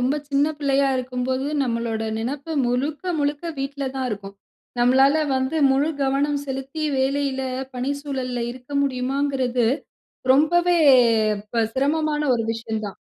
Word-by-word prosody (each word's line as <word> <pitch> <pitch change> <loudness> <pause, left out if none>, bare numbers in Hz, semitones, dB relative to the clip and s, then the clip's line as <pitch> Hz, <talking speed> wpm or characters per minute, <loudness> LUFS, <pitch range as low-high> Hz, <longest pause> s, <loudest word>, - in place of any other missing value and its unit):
ரொம்ப 260 +4 +1
சின்ன 280 +1 +3
பிள்ளையா 275 -1 +2
இருக்கும்போது, 255 +1 -2 0.2
நம்மளோட 230 -3 -2 0.2
நினைப்பு 280 +7 -4
முழுக்க 290 +9 -1
முழுக்க 290 +2 -1
வீட்ல 275 +1 -3
தான் 260 -1 -1
இருக்கும். 200 -2 -6 0.5
நம்மளால 265 +4 +5 0.2
வந்து 260 +4 -1
முழு 280 +4 +2
கவனம் 280 +1 +1
செலுத்தி 270 +3 -5 0.2
வேலையில, 270 0 0 0.3
பணிச்சூழல்ல 260 -2 -3
இருக்க 250 +2 -12
முடியுமாங்கிறது 260 -2 0 0.7
ரொம்பவே 345 +5 +3 0.8
ப 230 - +2
சிரமமான 300 +2 +1
ஒரு 230 - -1
விஷயம் 225 -1 -4
தான். 200 - -9
270 Hz, 120 wpm, -23 LUFS, 250-285 Hz, 0.8 s, நம்மளால